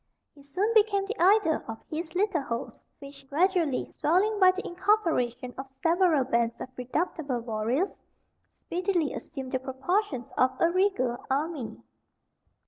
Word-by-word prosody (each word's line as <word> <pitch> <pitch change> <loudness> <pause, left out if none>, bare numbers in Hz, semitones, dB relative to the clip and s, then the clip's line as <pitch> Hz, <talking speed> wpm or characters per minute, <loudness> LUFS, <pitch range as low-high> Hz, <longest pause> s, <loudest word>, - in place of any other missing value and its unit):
He 285 - -17
soon 370 +11 -1
became 415 -3 +3
the 445 +4 -5
idol 375 -3 +4
of 225 -1 -5
his 325 +2 -5
little 390 -4 +1
host, 235 -3 -6
which, 275 -1 -13
gradually 335 -2 +1
swelling 400 +7 +1
by 370 -2 +7
the 370 +2 -1
incorporation 330 - 0
of 270 - -5 0.2
several 335 -4 +4
bands 235 -2 0
of - - -6
redoubtable 260 0 -2
warriors, 230 - -1 0.7
speedily 355 -3 0
assumed 265 -4 -7
the 260 - 0
proportions 265 - -2
of 260 0 +2
a 335 - +3
regal 360 -11 +1
army. 280 -2 -2
315 Hz, 135 wpm, -28 LUFS, 260-375 Hz, 0.7 s, by